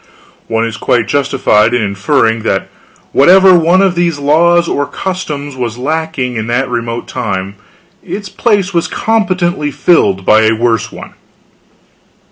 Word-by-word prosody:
One 115 0 -1
is 115 -1 -5
quite 120 -1 0
justified 135 -5 +1
in 120 - +1
inferring 115 +3 0
that 95 -3 -2 0.4
whatever 185 +6 +6
one 175 +2 +3
of 190 -2 +2
these 170 -3 0
laws 170 +4 +2
or 145 -3 -1
customs 150 -7 -5
was 120 -3 -4
lacking 140 -3 -3
in 110 0 -4
that 120 +3 0
remote 115 -1 -4
time, 95 +1 -4 0.5
its 205 0 -6
place 195 -2 0
was 170 -1 0
competently 185 -8 -1
filled 100 - +1
by 110 +1 +5
a 110 - +2
worse 115 0 -1
one. - - -11
140 Hz, 140 wpm, -12 LUFS, 115-175 Hz, 0.5 s, whatever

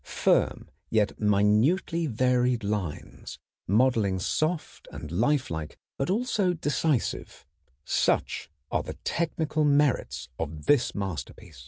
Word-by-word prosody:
Firm - - +1 0.2
yet 105 -2 +1
minutely 110 - +2
varied 125 -1 +1
lines, 100 -6 -4 0.3
modeling 110 -2 +2
soft 155 - -2
and 75 - -8
lifelike 95 - -1 0.2
but 135 - -2
also 205 -3 +1
decisive, 150 -4 -1 0.4
such - - 0 0.2
are - - +1
the - - -7
technical 160 -2 -1
merits 145 -2 +1
of 75 -2 -5
this 140 -4 +3
masterpiece. 90 -10 -6
125 Hz, 105 wpm, -27 LUFS, 100-155 Hz, 0.4 s, this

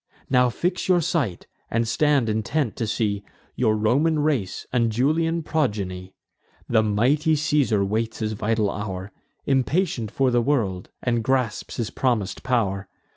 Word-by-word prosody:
"Now 125 -1 +4
fix 175 +9 -2
your 180 -1 +4
sight, 145 - -1 0.2
and 115 0 0
stand 145 0 +2
intent, 110 +4 -1
to 115 - -1
see 105 -2 -1 0.3
Your 110 -3 +2
Roman 140 +9 +2
race, 145 -11 -1
and 115 -3 +2
Julian 160 +8 +1
progeny. 100 -12 -2 0.5
The 110 -2 +3
mighty 130 +10 +2
Caesar 145 -9 +2
waits 110 +3 -1
his 110 -1 -2
vital 110 0 0
hour, 95 -1 -5 0.3
Impatient 135 - +1
for 130 +4 +1
the 120 0 +3
world, 110 -9 0
and 120 -2 +1
grasps 130 -2 -1
his 115 -2 -2
promis'd 115 -7 -1
pow'r. 100 -6 0
115 Hz, 140 wpm, -24 LUFS, 105-145 Hz, 0.5 s, Now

